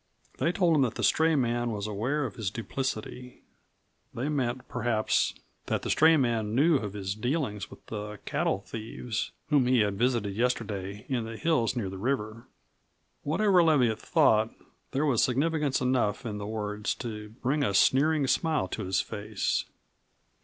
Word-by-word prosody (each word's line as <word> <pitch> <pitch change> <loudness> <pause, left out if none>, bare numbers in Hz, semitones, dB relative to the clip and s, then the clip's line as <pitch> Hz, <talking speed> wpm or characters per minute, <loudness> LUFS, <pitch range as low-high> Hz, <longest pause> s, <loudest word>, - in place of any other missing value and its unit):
They 165 - +2
told 175 -3 +3
him 145 - +4
that 125 -4 +1
the - - -3
stray 160 0 +3
man 120 -2 0
was 105 -2 -3
aware 120 +8 -1
of - - -5
his 110 -4 -3
duplicity; 125 +1 -5 0.7
they 130 +5 -2
meant 130 -4 -2
perhaps 120 -3 0 0.3
that - - -1
the - - -1
stray 160 +1 +6
man 115 -5 0
knew 150 +4 +5
of 105 -6 -5
his 100 -2 -3
dealings 110 - -2
with - - -15
the 105 -1 -6
cattle 95 - 0
thieves 110 +1 -5 0.2
whom 140 -4 +4
he 125 -2 +4
had 100 -1 0
visited 120 -5 +1
yesterday 105 -4 -2
in 120 -4 -1
the 115 0 -7
hills 140 -7 +1
near 115 -5 -2
the 95 0 -6
river. 115 -1 -2 0.7
Whatever 185 +4 +3
Leviatt 130 -9 +3
thought, 110 0 +3 0.4
there 140 +3 0
was 130 -6 +3
significance 145 +1 +1
enough 125 -4 +1
in 105 -2 -4
the 100 - -5
words 105 0 -2
to 105 -3 -6
bring 145 +4 +1
a 100 -7 0
sneering 145 +6 +4
smile 155 +3 +1
to 110 - -4
his 95 +1 +1
face. 105 0 -2
120 Hz, 165 wpm, -28 LUFS, 105-140 Hz, 0.7 s, stray